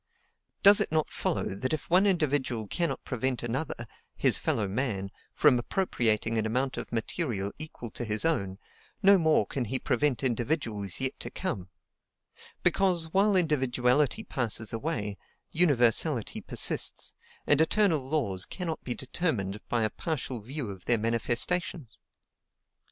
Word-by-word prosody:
Does 200 0 +8
it - - -1
not 155 -1 0
follow - - -1
that 115 +9 -3
if 155 - -3
one 185 +4 +4
individual 145 - 0
cannot 165 - -2
prevent 130 0 -2
another 120 +1 -3 0.3
his - - +4
fellow 105 - 0
man 100 -3 -2 0.2
from 140 -5 +5
appropriating 115 - +1
an 110 - -1
amount 130 +4 -1
of - - -6
material 115 - -2
equal 155 -7 -7
to - - -6
his 110 +2 0
own, 100 -13 0 0.5
no 195 0 +7
more 160 -2 +3
can 130 -3 -3
he 130 +5 -1
prevent 130 0 0
individuals 120 - -2
yet 130 0 -1
to - - -5
come; 110 - -4 0.9
because, 175 -4 +1
while 200 +1 +3
individuality 140 - +2
passes 115 - -1
away, 110 -5 -3 0.3
universality 135 -5 +2
persists, - - +1 0.3
and 145 +1 +4
eternal 175 -1 +3
laws 130 -9 -1
cannot 170 -4 -5
be 120 - -2
determined 120 - -2
by 120 -2 +1
a 110 - 0
partial 135 -7 -4
view 125 0 -5
of 95 -2 -11
their 120 - +3
manifestations? 120 +5 0
130 Hz, 140 wpm, -28 LUFS, 110-160 Hz, 0.9 s, Does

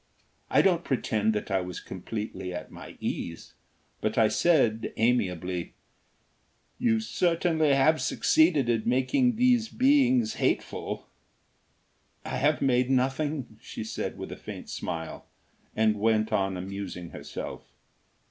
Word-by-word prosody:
I - - +4
don't 175 -3 +3
pretend 110 -4 0
that 105 -1 -3
I 95 -1 +2
was 90 -1 -6
completely 95 -1 -6
at 80 -3 -7
my - - -11
ease, 85 -1 -5 0.5
but - - -1
I 110 -1 +5
said, 125 -11 +2
amiably: 95 -7 0 1.0
"You 230 -2 +2
certainly 165 -7 +2
have 155 +4 +4
succeeded 155 -5 +3
in 115 -2 +2
making 130 - +2
these 245 -1 +3
beings 260 -4 +3
hateful." 130 - -1 1.2
"I - - -3
have 145 +1 +2
made 125 -1 +2
nothing," 135 -2 -1
she - - -6
said 110 - -4
with - - -7
a - - -7
faint - - -8
smile, 80 -1 -5 0.5
and 110 -1 +2
went 110 0 +2
on 95 -1 +1
amusing 95 -2 -6
herself. - - -7
125 Hz, 125 wpm, -28 LUFS, 105-165 Hz, 1.2 s, I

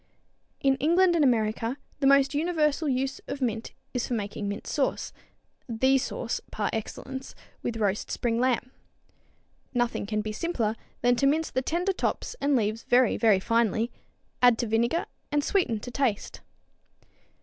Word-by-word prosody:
In 270 -1 +3
England 345 +6 +4
and 320 - +3
America 230 0 +1 0.2
the 275 - +3
most 275 +1 +5
universal 305 -1 +1
use 265 +1 -1
of 280 - -4
mint 230 -4 -2 0.2
is 250 -2 -1
for 245 - -1
making 205 -1 -3
mint 205 +2 -4
sauce, 280 -3 -1 0.6
the 260 +4 +3
sauce - - -3
par - - -2
excellence 265 +4 -5 0.3
with 230 - -3
roast 205 -2 0
spring 230 -1 0
lamb. 250 0 +1 1.0
Nothing 240 -4 0
can 215 0 0
be 215 0 -4
simpler 225 -4 -1 0.3
than 245 +1 +4
to 275 - +3
mince 315 +3 +1
the 260 - 0
tender 350 +8 0
tops 425 - -2
and 285 0 +3
leaves 220 -1 0
very, 245 -1 +3
very 215 -5 +4
finely, 230 +2 +1 0.5
add 245 -2 +6
to 240 - -1
vinegar 235 +8 +1 0.3
and 295 0 +2
sweeten 325 - +1
to 245 - -7
taste. 240 -5 -1
250 Hz, 155 wpm, -27 LUFS, 225-280 Hz, 1.0 s, add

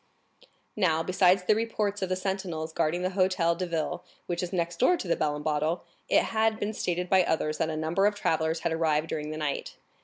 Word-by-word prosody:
Now, 165 -6 +2
besides 185 +1 +3
the 200 - +4
reports 210 -2 -1
of 190 - -1
the 185 - +1
sentinels 185 -4 -3
guarding 170 +4 0
the 185 - +1
Hôtel 185 -3 +2
de 180 +1 -3
Ville, 165 -2 -2 0.2
which 175 - -2
is 180 - -4
next 170 -2 -2
door 355 +8 +4
to 195 - -6
the 170 - +2
Bell 150 -1 0
and 150 - -6
Bottle, 155 +3 0 0.3
it - - +5
had 220 0 +1
been 210 +1 -2
stated 180 -3 -2
by 190 +1 +5
others 155 -2 -1
that 160 - +1
a 155 - -3
number 165 +6 +2
of 210 - 0
travellers 160 -4 0
had 170 - -1
arrived 160 -1 +1
during 150 -1 -3
the 155 - -5
night. 150 -2 -3
175 Hz, 220 wpm, -28 LUFS, 160-190 Hz, 0.3 s, it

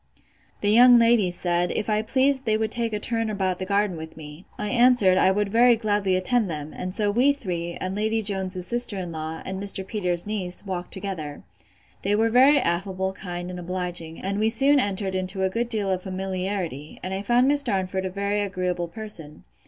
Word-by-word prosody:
The 205 - +3
young 245 +2 +8
ladies 230 -7 +3
said, 175 0 0
If 215 - -2
I 215 -1 +1
pleased 265 +3 +1
they 215 -1 +2
would 220 -1 -2
take 230 -1 0
a 210 - -2
turn 225 0 -1
about 190 -3 -1
the 185 - -4
garden 200 -2 +1
with 160 0 -9
me. 150 +3 -11
I 210 - -3
answered, 240 -5 +4
I 185 - +4
would 205 +1 0
very 235 +3 +5
gladly 205 -4 0
attend 205 +3 +1
them; 150 -1 -6
and 185 +1 -5
so 210 -1 +1
we 255 +7 +3
three, 175 -10 -4
and 185 0 -3
Lady 220 +2 0
Jones's 190 -3 -2
sister 240 -1 0
in 180 -2 -5
law, 160 0 -5
and 190 0 -4
Mr. 195 -1 -2
Peters's 180 -5 -1
niece, 200 -3 -4
walked 180 -2 -5
together. 180 -7 -4 0.6
They 200 +2 +1
were 225 +1 +2
very 265 +5 +6
affable, 190 -2 -1
kind, 175 -2 -6
and 180 - -7
obliging; 175 -2 -4
and 200 +2 -3
we 220 +1 +3
soon 275 +5 +4
entered 195 -4 -1
into 185 +1 -2
a 190 - +1
good 235 +3 -2
deal 210 -4 -1
of 185 -1 -1
familiarity; 185 -5 -4
and 185 - -4
I 190 - -2
found 240 +5 +3
Miss 290 +1 +4
Darnford 190 -6 -1
a - - -2
very 200 +2 -1
agreeable 180 -3 -2
person. 170 -5 -5
195 Hz, 205 wpm, -24 LUFS, 180-220 Hz, 0.6 s, young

